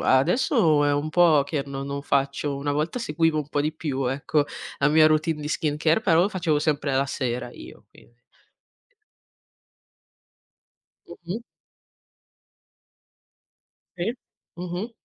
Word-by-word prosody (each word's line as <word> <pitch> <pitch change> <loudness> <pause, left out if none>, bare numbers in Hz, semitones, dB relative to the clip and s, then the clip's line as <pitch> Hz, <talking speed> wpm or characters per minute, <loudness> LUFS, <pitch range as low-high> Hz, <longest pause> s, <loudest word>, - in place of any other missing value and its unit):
adesso 160 - +3
è 145 - +2
un 145 +2 -1
po' 160 -4 +5
che 140 0 -2
no 135 0 -5
non 140 0 -4
faccio, 140 0 0
una 145 +1 -2
volta 150 - -1
seguivo 165 -6 0
un 145 - -4
po' 145 - -1
di 150 - 0
più, 140 -5 -3
ecco, 145 +3 0 0.3
la 140 - +3
mia 155 +1 +6
routine 155 0 +1
di 150 - -5
skincare, 155 +3 +1
però 170 -5 +4
lo 195 - +2
facevo 170 -7 0
sempre 150 -2 0
la 135 +1 +2
sera 125 -3 -3
io, - - -13
quin - - -20 3.0
Mh-mh. 180 +6 -6 2.6
Sì. 185 +7 -2 0.4
Mh-mh. 180 +5 -5
150 Hz, 130 wpm, -24 LUFS, 140-170 Hz, 3.0 s, mia